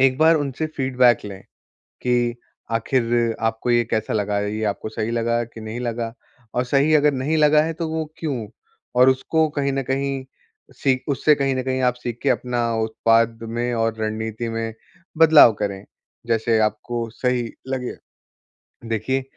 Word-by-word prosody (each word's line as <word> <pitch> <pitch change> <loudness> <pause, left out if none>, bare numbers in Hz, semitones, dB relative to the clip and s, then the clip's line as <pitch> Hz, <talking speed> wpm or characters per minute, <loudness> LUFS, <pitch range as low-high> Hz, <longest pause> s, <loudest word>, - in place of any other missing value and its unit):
एक 130 0 +4
बार 160 +1 +6
उनसे 145 +1 -2
फीडबैक 125 -3 +3
लें। 100 -2 -8 0.6
कि, 120 -1 +1 0.4
आखिर 115 0 +1
आपको 115 +2 0
ये 120 0 +4
कैसा 110 -1 -1
लगा, 105 -1 0
ये 105 +2 -3
आपको 105 +1 -3
सही 110 +1 -3
लगा 115 0 0
कि 115 0 -12
नहीं 110 +2 -6
लगा, 115 -1 -3 0.4
और 125 - +2
सही 140 +4 +2
अगर 150 -1 +4
नहीं 140 +4 0
लगा 150 0 +5
है 165 +1 -2
तो 165 0 -4
वो 160 0 -2
क्यों? 135 -9 -3 0.5
और 125 +1 +6
उसको 155 +5 +1
कहीं 140 -1 +1
न 135 - 0
कहीं 135 0 -2 0.5
सीख 130 -2 0
उससे 150 +2 +3
कहीं 135 -1 0
न 130 - -1
कहीं 130 0 -1
आप 125 -1 +2
सीख 120 -1 -5
के 140 - +2
अपना 125 -2 0 0.2
उत्पाद 115 +1 +2
में 120 +2 -2
और 115 -1 0
रणनीति 110 +1 -3
में 115 0 -3 0.4
बदलाव 160 -7 +8
करें, 100 -2 -3 0.4
जैसे 115 0 +2
आपको 115 +2 -1
सही 125 -2 -1 0.2
लगे। 130 -2 -3 1.0
देखिए, 125 +5 -1
120 Hz, 165 wpm, -22 LUFS, 115-135 Hz, 1.0 s, बदलाव